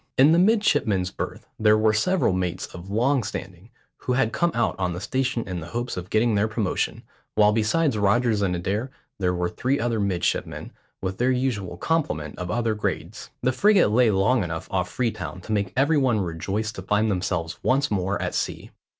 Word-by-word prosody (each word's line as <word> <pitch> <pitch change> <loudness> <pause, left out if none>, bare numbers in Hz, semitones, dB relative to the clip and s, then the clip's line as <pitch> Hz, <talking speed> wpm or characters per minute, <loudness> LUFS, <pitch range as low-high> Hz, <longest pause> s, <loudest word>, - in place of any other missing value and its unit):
In 140 +4 +7
the 165 - +5
midshipmen's 145 - +2
berth - - -6
there 110 0 +5
were 110 0 +3
several 140 - +2
mates 90 -1 -2
of 90 +1 -9
long 125 +6 +2
standing, 95 -2 -7 0.3
who 125 - -2
had 125 -3 +1
come 170 - +2
out 120 - +1
on 90 -2 0
the 90 - -5
station 125 +2 -1
in 90 -2 -3
the 80 - -8
hopes 120 0 -3
of 90 0 -6
getting 110 +2 +2
their 105 +1 +2
promotion, 110 -4 -2 0.3
while 105 -1 +5
besides 115 +4 +1
Rogers 105 +2 +2
and 95 -3 +1
Adair 100 +8 -2 0.3
there 90 -2 +1
were 90 0 0
three 130 +10 -1
other 115 -2 0
midshipmen, 95 -4 -1 0.3
with 95 0 -3
their 125 +1 +2
usual 125 -9 -1
complement 90 - -1
of 90 0 -4
other 115 +2 0
grades. 105 -2 -4
The 130 - +3
frigate 195 - +4
lay 115 +2 +4
long 100 +4 +2
enough 80 -2 -5
off 90 -2 0
Freetown 115 -6 -3
to 110 - -8
make 100 -3 0
every 145 +3 +3
one 125 -5 +2
rejoice 95 +5 -2
to 100 - -8
find 105 +3 +1
themselves 90 -3 -2
once 135 +1 +1
more 95 0 0
at - - -2
sea. - - -3
105 Hz, 195 wpm, -24 LUFS, 95-125 Hz, 0.3 s, In